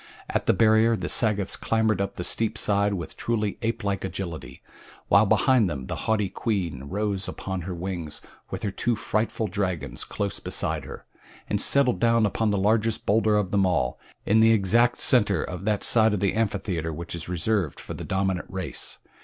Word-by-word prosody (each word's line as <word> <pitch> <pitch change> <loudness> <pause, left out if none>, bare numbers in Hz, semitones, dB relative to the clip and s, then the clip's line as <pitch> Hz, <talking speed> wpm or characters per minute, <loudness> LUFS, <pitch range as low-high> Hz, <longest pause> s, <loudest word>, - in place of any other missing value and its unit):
At - - -1
the - - +5
barrier 110 +2 +4
the - - -4
Sagoths 105 -4 +1
clambered 110 -3 +1
up 100 - -3
the 90 - -4
steep 110 +4 +1
side 100 -1 +2
with 85 -4 -6
truly 110 -3 -2
apelike 110 -4 -2
agility, 95 -3 -6 0.5
while 100 +2 +5
behind 125 -3 +3
them 70 -5 -5
the - - -4
haughty 105 -2 +2
queen 90 - -3
rose 100 +4 -2
upon 95 0 -4
her 90 +1 -5
wings 85 -4 -5 0.3
with - - -6
her 100 - -1
two 120 +4 0
frightful 110 +1 -1
dragons 90 - -3
close 100 -1 -4
beside - - -1
her, - - -10 0.4
and - - 0
settled 140 -3 +3
down 115 -1 +3
upon 105 +2 0
the 100 - +1
largest 110 +3 +1
bowlder 110 0 +3
of 100 -3 -1
them 100 -1 +3
all 90 -4 0 0.3
in 110 +2 +4
the 115 0 +6
exact 115 +4 +3
center 105 -9 +3
of 90 +2 -6
that 105 -2 0
side 110 -2 +4
of - - -2
the 100 0 +1
amphitheater 100 -7 -1
which 85 +2 -6
is 85 0 -5
reserved 90 -1 -1
for - - -7
the - - -7
dominant 95 -1 -1
race. 95 -2 -3
100 Hz, 185 wpm, -25 LUFS, 90-110 Hz, 0.5 s, the